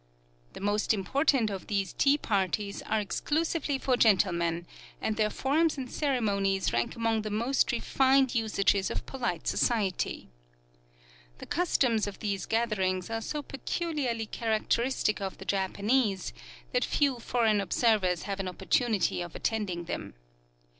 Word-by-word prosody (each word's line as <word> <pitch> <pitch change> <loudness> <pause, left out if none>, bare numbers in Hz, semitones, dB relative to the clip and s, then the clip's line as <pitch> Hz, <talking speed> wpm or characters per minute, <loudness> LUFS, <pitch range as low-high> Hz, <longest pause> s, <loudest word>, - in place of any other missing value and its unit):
The - - -9
most 205 +2 +1
important 250 - +1
of 195 -2 -6
these 200 -2 -1
tea 280 +1 +3
parties 200 - -1
are 220 - +1
exclusively 300 - -1
for 260 -1 +1
gentlemen, 175 -6 +2 0.3
and 220 - -1
their 215 -1 +2
forms 305 +7 +1
and 260 -2 -5
ceremonies 200 - 0
rank 120 - 0
among 225 -1 +1
the 215 - -4
most 235 +7 +1
refined 265 +2 +3
usages 205 -4 +1
of - - -4
polite 240 -11 -3
society. 205 - 0 1.1
The - - -9
customs 255 -11 +1
of 200 - -6
these 200 -3 -3
gatherings 205 -4 0
are 225 0 -2
so 295 +6 -4
peculiarly 275 -5 -2
characteristic 220 0 0
of 195 -1 -4
the - - -10
Japanese 200 +2 0 0.4
that - - +1
few 275 -4 +1
foreign 225 -3 +2
observers 195 -3 +2
have 200 -1 -4
an 195 - -2
opportunity 200 +1 0
of 175 -1 -7
attending 205 -6 -2
them. 115 - -6
220 Hz, 135 wpm, -29 LUFS, 195-255 Hz, 1.1 s, tea